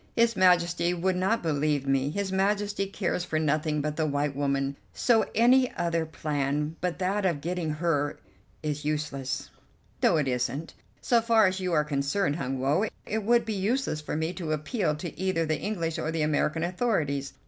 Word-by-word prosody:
"His 230 -1 +3
Majesty 175 -1 +3
would 185 +2 0
not 190 +5 +1
believe 150 -3 0
me; 135 0 +1
his 195 +4 -2
Majesty 200 +1 0
cares 185 -2 -2
for 160 - -2
nothing 155 0 +1
but 150 0 -3
the 160 -1 +1
white 145 -1 -1
woman; 140 0 0 0.2
so 225 -3 +3
any 250 +3 +5
other 170 -1 0
plan 150 0 -2
but 180 -1 -1
that 195 +2 0
of 175 -6 +1
getting 175 +1 -2
her 150 -2 0 0.5
is 150 -1 -2
useless." 145 -2 -3 0.5
"No, - - +4
it 150 -3 +1
isn't. 130 +5 -2 0.3
So 235 -2 +3
far 225 -1 +4
as 190 0 +1
you 185 -1 -2
are 150 -2 +4
concerned, 145 +3 0
Hun 135 -3 -2
Woe, 145 +11 +1 0.2
it 220 +1 -2
would 235 +3 +3
be 220 - -2
useless 205 - -1
for 150 - -4
me 160 +3 -1
to 165 -5 -3
appeal 155 - -1
to 165 +1 -7
either 185 -3 +1
the 155 0 -1
English 170 -6 -2
or - - -2
the 160 -1 0
American 155 +1 +1
authorities. 170 - -1
165 Hz, 180 wpm, -27 LUFS, 150-190 Hz, 0.5 s, any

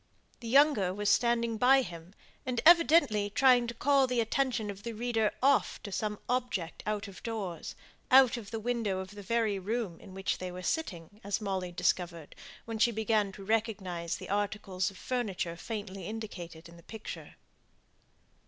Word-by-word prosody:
The 235 - -8
younger 240 -8 +4
was 205 0 +1
standing 235 -2 +2
by 265 +2 +6
him, 170 -1 -10 0.3
and 250 -2 -2
evidently 325 -11 +5
trying 245 +2 +4
to 235 - -5
call 275 +2 +3
the 250 -1 0
attention 230 -2 0
of 200 0 -11
the 235 +2 -5
reader 225 -1 0
off 275 0 +3
to 205 - -7
some 210 +1 -2
object 245 -9 -2
out 210 -1 -2
of 195 -2 -11
doors 200 -8 -5 0.3
out 265 -1 +7
of 225 -5 -7
the 225 - -4
window 225 -4 -1
of 190 +1 -6
the 205 0 -9
very 215 -1 0
room 205 -2 -3
in 190 - -13
which 195 0 -2
they 185 0 -5
were 180 +1 -8
sitting, 205 - -3
as 200 0 -1
Molly 190 -4 -3
discovered 170 -2 -1 0.3
when 225 -1 -5
she 235 - +5
began 220 -2 +1
to 195 0 -10
recognize 195 -6 -1
the - - -9
articles 200 -2 -1
of 195 - -14
furniture 200 -9 -2
faintly 200 0 -6
indicated 180 -7 -7
in 170 0 -15
the - - -14
picture. 220 +6 -9
215 Hz, 170 wpm, -30 LUFS, 190-235 Hz, 0.3 s, out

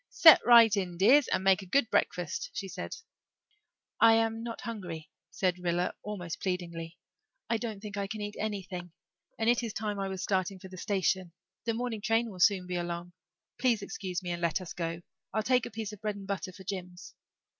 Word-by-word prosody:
"Set 320 -4 +9
right 230 -3 +8
in, 180 -3 -2
dears, 245 +9 +6
and - - 0
make 190 0 +4
a - - -9
good 270 +4 +3
breakfast," 175 -3 0
she 195 - -3
said. - - -6 1.0
"I 225 0 +7
am 225 0 +1
not 230 0 -6
hungry," 180 -9 -6 0.2
said 180 -2 0
Rilla 175 0 0
almost 180 -5 -5
pleadingly. 170 -2 -3 0.5
"I 230 - +3
don't 220 -3 -5
think 205 -1 -7
I 200 0 -1
can 215 +2 -5
eat 205 0 -5
anything. 185 -5 -4 0.4
And 225 - -1
it 240 +1 +4
is 230 -3 -4
time 210 -2 -3
I 195 - -1
was 190 -1 -4
starting 190 -1 0
for 190 0 -11
the 185 - -10
station. 185 -2 0 0.3
The 230 -1 0
morning 235 -2 -3
train 225 +1 +1
will 185 - -10
soon 185 0 +4
be 180 0 -3
along. 175 0 -4 0.5
Please 235 -5 +2
excuse 185 -2 -4
me 175 - -3
and 175 0 -3
let 170 +1 +1
us 185 -3 -7
go 165 -1 -3 0.3
I'll 215 - +1
take 250 0 +2
a - - -8
piece 220 -1 -5
of 210 - -11
bread 210 -2 -2
and 200 -1 -9
butter 195 -1 -3
for 190 +1 -12
Jims." 180 -1 -6
195 Hz, 205 wpm, -30 LUFS, 180-220 Hz, 1.0 s, Set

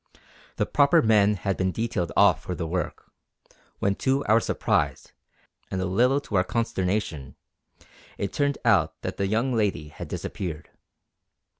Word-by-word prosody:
The - - 0
proper 145 +3 +4
men 105 -2 +4
had 95 +1 -2
been 95 0 0
detailed 110 -5 -2
off 100 -3 +5
for 90 - -5
the 85 - -3
work; 85 -1 -4 0.7
when 100 - +1
to 135 +1 0
our 110 +2 +5
surprise, - - -1 0.6
and 95 - -3
a 95 - -1
little 125 +9 +2
to 105 - -2
our 90 - +4
consternation, 95 - -2 0.8
it 100 - -3
turned 145 -1 0
out 100 -6 +3
that - - -4
the 100 - 0
young 115 +6 0
lady 100 -10 0
had - - -8
disappeared. 80 -5 -5
100 Hz, 150 wpm, -25 LUFS, 90-115 Hz, 0.8 s, off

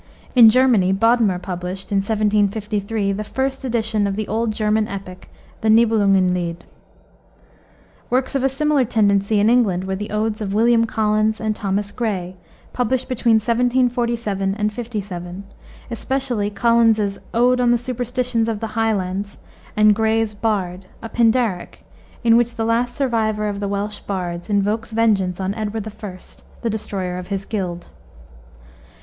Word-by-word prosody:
In 235 -3 +9
Germany 235 -6 +4
Bodmer 225 -2 +3
published, 180 +1 -6
in 200 - +2
1753, 210 0 0
the 200 +2 -3
first 265 +5 -3
edition 225 -4 0
of 195 - -2
the 215 0 -3
old 225 +1 -1
German 215 0 0
epic, 190 -2 -8 0.3
the 220 - +1
Nibelungen 205 -5 +4
Lied. 170 -1 -3 1.5
Works 255 +2 0
of 270 -2 0
a 270 - +3
similar 295 0 +1
tendency 205 -2 +2
in 205 - +3
England 220 -7 +3
were 190 0 -3
the 205 +2 -5
odes 215 +1 -2
of 200 -1 -3
William 230 +1 +4
Collins 215 0 0
and 215 -1 -1
Thomas 205 0 -2
Gray, 195 -5 -3 0.4
published 255 +1 0
between 240 -2 +2
1747 235 -3 0
57, 200 -5 -6 0.5
especially 245 -3 -1
Collins's 220 -1 +2
Ode 250 +2 +3
on 245 - +3
the 240 - +4
Superstitions 245 -1 -1
of 220 -2 -2
the 225 - -5
Highlands, 200 -3 -1 0.4
and 215 0 +6
Gray's 220 0 +1
Bard, 195 -4 -2 0.2
a 225 - -6
pindaric, 230 -6 0 0.4
in 230 -1 +5
which 240 0 +1
the 225 -1 -2
last 240 +2 0
survivor 220 -5 0
of 200 -1 -3
the 200 - -2
Welsh 205 +1 -3
bards 175 -2 -4
invokes 210 +3 0
vengeance 200 -5 +1
on 190 +1 -1
Edward 215 0 -4
I., 205 -3 -8 0.5
the 230 - 0
destroyer 190 -4 -4
of 180 - -8
his 195 -1 -3
guild. 180 -5 -4
215 Hz, 145 wpm, -20 LUFS, 200-230 Hz, 1.5 s, In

